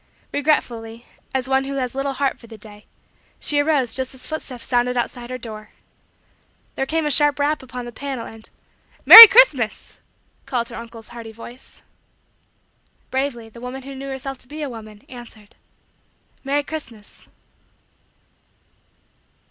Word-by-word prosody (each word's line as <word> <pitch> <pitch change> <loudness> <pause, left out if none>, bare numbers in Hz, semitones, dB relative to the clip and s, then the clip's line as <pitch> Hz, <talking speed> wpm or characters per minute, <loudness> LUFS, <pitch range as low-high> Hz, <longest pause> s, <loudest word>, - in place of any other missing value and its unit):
Regretfully, 235 -6 -2 0.3
as 260 -1 -2
one 265 0 0
who 275 0 -5
has 255 -3 -3
little 275 +1 -3
heart 275 +1 -2
for 230 - -16
the 225 -1 -12
day, 210 0 -16 0.5
she 290 - 0
arose 290 -5 0
just 260 0 -4
as 260 - -13
footsteps 265 -6 -6
sounded 245 0 0
outside 240 0 -4
her 255 - -5
door. 215 -3 -10 1.0
Then 270 - -3
came 320 +1 -1
a 295 - 0
sharp 290 0 +3
rap 295 +1 -1
upon 250 -1 -8
the 240 - -8
panel 265 -1 -6
and 225 0 -11 0.6
"Merry 455 0 +14
Christmas" 390 - +2 0.5
called 235 -2 -3
her - - -10
uncle's 230 -1 -11
hearty 235 -2 -10
voice. 235 +3 -12 1.3
Bravely 260 -4 -3
the 235 +1 -15
woman 255 +2 -8
who 275 +1 -9
knew 270 +1 -8
herself 270 0 -7
to - - -21
be 300 +3 -7
a 285 - -4
woman 215 -2 -12
answered: 235 -4 -13 0.9
"Merry 285 +1 -1
Christmas." 265 -9 -10
255 Hz, 150 wpm, -20 LUFS, 230-275 Hz, 1.3 s, Merry